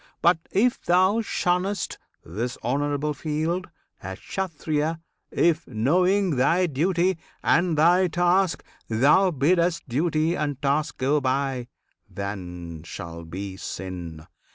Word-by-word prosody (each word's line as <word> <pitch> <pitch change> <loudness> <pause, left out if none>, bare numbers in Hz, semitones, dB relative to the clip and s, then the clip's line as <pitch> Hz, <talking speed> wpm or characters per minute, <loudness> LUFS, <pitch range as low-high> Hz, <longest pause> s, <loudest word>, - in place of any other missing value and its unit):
But, 170 -1 +5
if 240 +5 +2
thou 185 +5 +3
shunn'st 190 -1 -1 0.3
This 115 +9 -4
honourable 145 +4 0
field 160 +5 -2 0.3
a 95 0 -6
Kshattriya 160 - -2 0.3
If, 170 -1 +1
knowing 180 - +2
thy 170 +8 +3
duty 175 +3 +1 0.2
and 170 -2 +3
thy 175 +4 +5
task, 175 +1 +2 0.3
thou 140 - +4
bidd'st 170 +3 +2
Duty 155 +5 +1
and 145 -4 -2
task 145 +2 0
go 140 +3 +1
by 130 -1 -1 0.4
that 100 0 -4 0.4
shall 85 -2 -8
be 95 +3 -6
sin! 85 -5 -6
155 Hz, 110 wpm, -25 LUFS, 130-175 Hz, 0.4 s, But